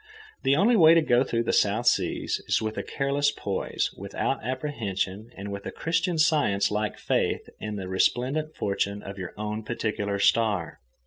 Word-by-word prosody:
The 135 +1 +3
only 205 +10 +4
happy - - +5
way 160 0 +9
to 165 - +4
go 125 -3 +4
through 115 -3 -1
the - - -1
South 105 +4 +2
Seas - - +1
is - - +2
with 110 0 -3
a - - -2
careless 140 +1 0
poise, 100 -8 -2
without - - -3
apprehension, 115 -6 -3
and 100 +1 -6
with 100 0 -6
a - - -4
Christian 165 +1 -1
Science 145 - +3
like 105 0 -1
faith - - 0
in 105 -1 -4
the 95 -2 -5
resplendent 130 +11 0
fortune 100 0 -2
of 100 0 -8
your 95 - -6
own 105 +1 -3
particular 105 -3 -2
star. 100 -4 +1
110 Hz, 180 wpm, -26 LUFS, 100-145 Hz, -, way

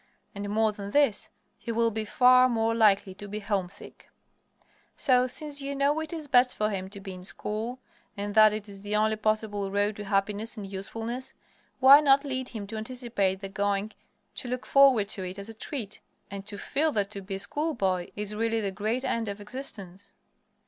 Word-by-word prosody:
And, 200 -1 -5
more 220 +1 +2
than 200 -1 -7
this, 280 -3 +2 0.3
he 235 - -5
will 230 0 +2
be 220 0 -3
far 255 +3 +5
more 225 -1 +1
likely 205 -4 +3
to 205 +2 -9
be 210 +1 -5
homesick. 200 -3 -4 0.9
So, 255 -1 +3
since 290 +2 -2
you 280 0 -4
know 285 +2 +2
it 315 -1 -4
is 320 -3 -5
best 250 -2 +4
for 215 0 0
him 190 -1 -4
to 200 0 -8
be 195 -1 -8
in 180 0 -10
school, 215 +6 -3 0.4
and 205 0 -3
that 215 0 +7
it 215 0 -5
is 200 -1 -11
the 205 +1 -2
only 215 +1 +2
possible 215 -2 -1
road 205 +1 0
to 210 - -6
happiness 205 +3 -1
and 205 - -5
usefulness, 225 +6 -5 0.4
why 275 +2 +9
not 280 -1 +4
lead 260 -2 -3
him 220 -5 -6
to 220 +2 -7
anticipate 220 -5 -2
the 195 - -5
going; 200 +1 -1 0.4
to 255 - -5
look 250 +1 -3
forward 270 -7 +5
to 195 - +1
it 185 +1 -5
as 200 +2 -6
a - - -7
treat, 220 -2 -5 0.3
and 200 0 -7
to 205 - -4
feel 305 +8 0
that 200 -1 0
to 200 - -6
be 195 0 -5
a - - -4
schoolboy 200 - -1
is 210 0 -3
really 225 +1 0
the 200 -3 -1
great 215 +6 -2
end 230 -1 -1
of 200 +1 -5
existence? 205 -5 -7
215 Hz, 200 wpm, -28 LUFS, 200-250 Hz, 0.9 s, why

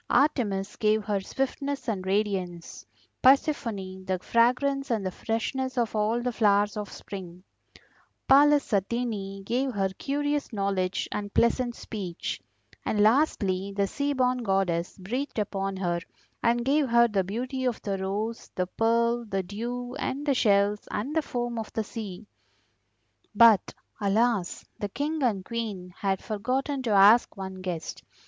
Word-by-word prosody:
Artemis 205 -9 +1
gave 215 0 +2
her 205 -2 0
swiftness 275 +5 -3
and 190 -5 -2
radiance, 190 -4 -2 0.3
Persephone 230 - +2
the 185 0 -1
fragrance 255 +7 +2
and 220 -5 0
the 185 - -1
freshness 255 +6 -2
of 235 -2 0
all 220 +3 +1
the 250 - 0
flowers 205 -2 +3
of 210 -1 -5
spring; 185 -2 -9 0.8
Pallas 290 -1 +5
Athene 200 -1 -1
gave 255 +6 0
her 195 -2 0
curious 290 +8 -2
knowledge 195 -3 -1
and 205 -1 -4
pleasant 240 +1 +2
speech; 190 -6 -5 0.4
and, 210 - -1
lastly, 205 -5 +2
the 200 0 +2
Seaborn 255 +1 0
Goddess 190 -6 0
breathed 245 +10 -4
upon 195 -2 -2
her 175 -2 0 0.4
and 235 0 +2
gave 280 0 +2
her 235 0 +6
the 200 -4 0
beauty 255 +7 -3
of 245 -3 0
the 195 -3 -2
rose, 210 +4 -3
the 180 - 0
pearl, 235 +4 +1
the 195 -3 -2
dew, 240 +6 -5
and 285 +1 -3
the 285 - +3
shells 205 -3 +2
and 265 +9 -3
the 320 - +3
foam 240 -4 -3
of 220 - -6
the 220 - -1
sea. 210 -2 -7 1.1
But, 225 -3 +6 0.2
alas! 210 -2 +1
the 205 - -3
King 300 +7 -2
and 210 -7 0
Queen 210 -6 -4
had 195 -2 -1
forgotten 260 +6 -1
to 250 - -3
ask 205 +3 +6
one 190 -1 -6
guest. 175 -4 -5
215 Hz, 145 wpm, -27 LUFS, 195-250 Hz, 1.1 s, her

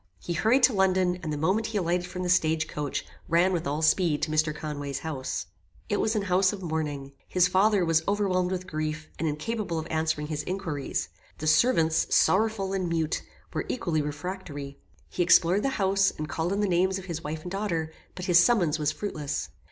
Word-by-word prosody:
He 175 - -4
hurried 230 +10 +3
to 255 - +6
London, 185 -2 +2
and 155 - -4
the 150 - -2
moment 190 +9 +1
he 220 - -2
alighted 180 -1 0
from 180 0 -5
the - - -2
stage 160 -3 +2
coach, 145 -2 -3 0.2
ran 175 +3 +3
with 165 -4 -1
all 150 +3 -1
speed 155 -1 +2
to 155 - -1
Mr. 155 0 +2
Conway's 145 -2 -5
house. 135 - -3 0.4
"It 205 - 0
was 220 - +1
an 210 - 0
house 185 0 +3
of 200 -3 -7
mourning. 150 -4 -3 0.2
His 180 -1 +3
father 195 +1 +3
was 165 -1 +3
overwhelmed 190 -3 +1
with 185 0 -3
grief, 155 -1 -4
and 160 - 0
incapable 170 +4 -2
of 160 - -3
answering 160 -1 0
his 150 -1 -3
inquiries. 175 -7 -3 0.3
The 155 - -6
servants, 160 -2 +3
sorrowful 200 -1 +2
and 185 -3 -1
mute, 160 -2 0 0.3
were - - -3
equally 170 -10 0
refractory. 145 -2 -6 0.3
He - - -3
explored 175 +2 +5
the 275 - +1
house, 195 0 +3
and 155 - -6
called 160 +5 -2
on 200 +1 0
the 205 - +2
names 185 +1 +2
of 190 - -8
his 165 -3 -5
wife 155 +1 -5
and 180 - -7
daughter, 170 -6 -2 0.2
but 180 - -5
his 175 -2 +6
summons 175 -9 +2
was 150 0 +1
fruitless. 155 -7 -4
175 Hz, 200 wpm, -27 LUFS, 155-190 Hz, 0.4 s, to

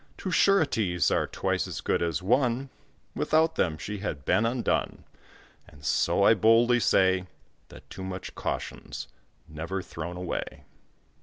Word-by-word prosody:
Two 185 - -4
sureties 115 - +2
are - - +1
twice - - -1
as - - -5
good - - 0
as 85 +1 -1
one, 125 +4 +1 0.4
Without 160 +1 +2
them 80 - 0
she 105 +5 -5
had 75 -9 -5
been 115 - +3
undone. 120 +1 -1 0.6
And 70 0 -15
so 100 - +2
I 110 - +7
boldly 115 +3 +4
say, 95 -3 +3 0.4
That - - -14
too 95 - -8
much 95 -1 -6
caution's - - -5 0.4
never 85 +5 -5
thrown 85 +2 -7
away. 90 -1 -5
100 Hz, 140 wpm, -27 LUFS, 90-120 Hz, 0.6 s, I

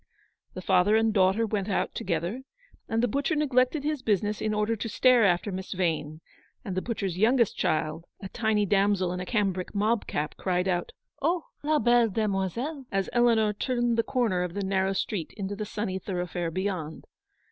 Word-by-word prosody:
The 185 - -6
father 185 +5 +4
and 225 0 +3
daughter 195 +3 +3
went 210 -2 -2
out 200 - 0
together, 180 +6 -2 0.5
and 225 0 0
the - - +4
butcher 280 +7 0
neglected 280 -1 +2
his 300 -2 -1
business 210 -1 0
in 215 - 0
order 210 +2 0
to 225 +1 -4
stare 250 0 +4
after 180 +2 +1
Miss 190 0 -5
Vane, 160 -4 -2 0.4
and 190 - -4
the 185 - 0
butcher's 195 -6 -3
youngest 235 +1 +3
child, 155 +1 -1
a 195 - -6
tiny 220 0 0
damsel 195 -2 +2
in 180 - -4
a 180 - -5
cambric 195 -4 -1
mob 215 +2 +1
cap, 150 +1 -2
cried 180 0 0
out, 175 -2 -1 0.2
" - - -39
Oh, 335 +3 +1 0.2
la 305 +1 +2
belle 240 -3 +4
demoiselle! 215 - -1
n 265 - -13
as 195 -1 -1
Eleanor 230 -3 +3
turned 240 +1 0
the 230 - +3
corner 230 -7 0
of 180 -1 -3
the 200 - -2
narrow 190 0 +1
street 190 -3 -3
into 200 0 -3
the 210 +1 -4
sunny 200 -2 -3
thoroughfare 180 -2 -3
beyond. 180 -3 -4
205 Hz, 190 wpm, -27 LUFS, 185-230 Hz, 0.5 s, father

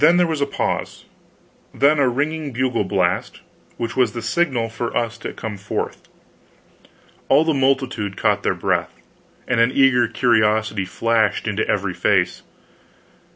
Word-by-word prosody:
There 175 +3 +6
was 160 -3 -2
a 140 - +1
pause, - - -3 0.7
then 145 +2 +3
a 135 -3 +3
ringing 150 +3 -2
bugle 125 -2 0
blast, 95 -2 -1 0.4
which 115 0 -4
was 125 -5 +2
the 120 - -5
signal 125 -2 0
for 115 +1 -4
us 115 -1 -1
to - - -5
come 110 -2 -6
forth. 95 - -5 1.2
All 145 +4 +5
the 160 - +2
multitude 130 -7 0
caught - - +1
their - - 0
breath, - - -1 0.5
and 125 -2 +1
an 115 +2 +4
eager 130 -3 +4
curiosity 110 -4 +1
flashed 115 +3 0
into - - -1
every - - -1
face. - - +1
120 Hz, 145 wpm, -21 LUFS, 110-140 Hz, 1.2 s, There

